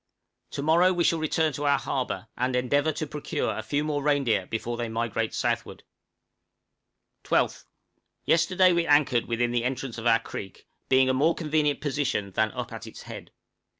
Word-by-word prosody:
To 140 - -3
morrow 170 +4 +4
we 175 -1 +1
shall 165 0 +2
return 155 0 +1
to 145 +2 -4
our 140 -1 +4
harbor, 130 -4 -3
and 125 +1 -1
endeavor 140 +5 +2
to 155 +1 -4
procure 145 -7 -3
a 110 - -3
few 145 +7 -1
more 150 -1 -1
reindeer 140 -9 +1
before 115 +1 -3
they 120 -1 -3
migrate 115 -1 -2
southward. - - -2 1.4
12th. - - 0 0.6
Yesterday 180 +2 +4
we 170 -1 +1
anchored 145 -5 +3
within 120 +1 0
the 120 -1 0
entrance 125 -1 -3
of 115 - -2
our 115 -1 +6
creek, 100 -4 -9 0.2
being 130 0 +5
a 130 - +2
more 155 +6 +2
convenient 150 -2 0
position 135 -9 -1
than 110 +3 +1
up - - -5
at - - -8
its - - -11
head. - - -9
135 Hz, 175 wpm, -26 LUFS, 120-155 Hz, 1.4 s, our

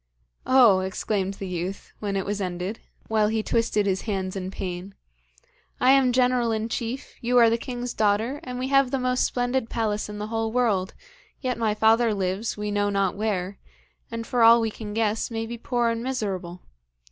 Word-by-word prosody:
'Oh,' 245 -7 +6
exclaimed 190 +1 -2
the 195 - -6
youth, 180 +2 -5
when 200 -2 -3
it 195 - -1
was 205 0 -2
ended, 180 +3 -3 0.3
while 215 -1 +2
he 220 0 0
twisted 225 -3 +1
his 190 -1 0
hands 190 -3 -3
in 185 -1 -4
pain, 190 0 -6 0.8
'I 255 - +5
am 270 -2 +5
general 250 -1 +2
in 220 +1 -2
chief, 235 +3 -4
you 245 +1 +2
are 230 -2 +6
the - - +3
king's 245 0 -5
daughter, 220 +6 +1
and 250 -1 -6
we 255 +1 -2
have 275 -2 +4
the 270 - 0
most 250 0 +1
splendid 245 -1 -1
palace 215 -2 -1
in 210 - -6
the 210 - -4
whole 225 0 -1
world, 215 -6 +1 0.4
yet 255 -2 -1
my 220 -2 +1
father 220 0 +3
lives 195 +4 -2
we 210 0 -3
know 205 0 +1
not 195 -2 0
where, 200 -2 -2 0.5
and 230 0 -5
for 245 0 0
all 230 +1 +8
we 225 -1 0
can 210 -1 -7
guess, 220 -1 0
may 225 -1 -3
be 235 +1 -6
poor 240 -1 0
and 230 0 -2
miserable. 195 -9 -4
220 Hz, 195 wpm, -25 LUFS, 195-240 Hz, 0.8 s, all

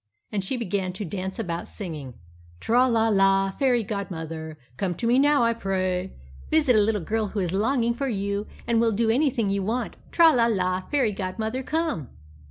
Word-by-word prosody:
And 200 -2 -1
she 250 +7 -2
began 190 -5 -2
to 200 +3 -5
dance 190 +2 -4
about, 175 -6 -4
singing 155 - -6 0.4
"Tra 245 - +3
la 225 -2 +2
la, 195 -1 +3
fairy 245 0 +1
godmother, 160 -6 -5 0.2
Come 180 +4 -2
to 230 - -4
me 240 +3 +4
now, 290 -2 +4
I 230 0 +3
pray; 190 -3 -2 0.3
Visit 300 -6 +4
a - - +6
little 210 -3 0
girl 220 +3 -1
who 205 - -4
is 180 -2 -1
longing 235 +3 +1
for 275 +3 -3
you 200 -2 -2 0.2
And 235 -1 +2
will 230 -1 +2
do 225 +2 +2
anything 245 -5 +1
you 200 0 0
want. 225 +6 -2
Tra 330 -2 +6
la 235 -3 +3
la, 185 -4 0
fairy 265 -7 +2
godmother, 220 +6 -3
come." 305 - -2
210 Hz, 185 wpm, -25 LUFS, 190-235 Hz, 0.4 s, a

